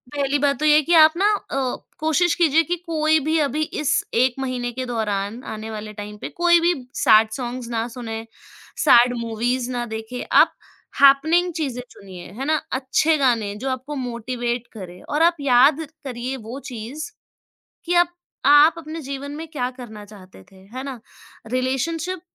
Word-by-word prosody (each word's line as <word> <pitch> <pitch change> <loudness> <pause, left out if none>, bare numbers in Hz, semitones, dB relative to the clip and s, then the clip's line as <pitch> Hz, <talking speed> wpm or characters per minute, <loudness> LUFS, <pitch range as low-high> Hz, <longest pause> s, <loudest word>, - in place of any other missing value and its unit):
पहली 285 0 0
बात 280 0 +1
तो 305 - 0
ये 300 -1 +6
है 305 - +5
कि 340 - 0
आप 315 -1 +7
ना 400 +3 +3
अ, 270 -9 -3 0.2
कोशिश 320 +3 +2
कीजिए 325 -2 +3
कि 345 +3 -2
कोई 315 -1 +2
भी 315 +1 +1
अभी 300 +1 0 0.2
इस 300 - +1
1 250 +1 +2
महीने 250 -2 -3
के 255 +1 -4
दौरान 220 -1 -3
आने 220 +1 -7
वाले 215 0 -7
टाइम 210 0 -8
पे, - - -6
कोई 345 0 +3
भी 350 +1 +3 0.2
सैड 220 0 +5
सॉन्ग्स 245 -1 -5
ना 230 0 -2
सुनें, 225 -2 -5 0.6
सैड 245 -3 +6
मूवीज़ 240 +2 -2
ना 240 -1 -2
देखें। 225 +3 -6
आप - - +5 0.5
हैपनिंग 315 +6 +5
चीज़ें 270 -6 -3
चुनिए, 185 -3 -12
है 270 - -3
ना? 310 +2 +2 0.2
अच्छे 275 +4 +1
गाने, 230 -7 +1
जो 260 +6 -4
आपको 260 +3 -4
मोटिवेट 240 -1 -3
करें 180 -4 -10
और 295 - -2
आप 340 0 +4
याद 275 +2 +5 0.3
करिए 255 0 -4
वो 235 +3 -8
चीज़, 250 - -6 0.8
कि 345 - -1
अब 350 0 +5 0.4
आप 295 +3 +7
अपने 320 0 -7
जीवन 280 0 -6
में 320 +2 -7
क्या 250 -5 -2
करना 235 -5 -10
चाहते 190 - -15
थे, - - -19 0.2
है 260 - -4
ना? 270 -4 -6 0.5
रिलेशनशिप 320 +8 -2
260 Hz, 175 wpm, -22 LUFS, 235-305 Hz, 0.8 s, आप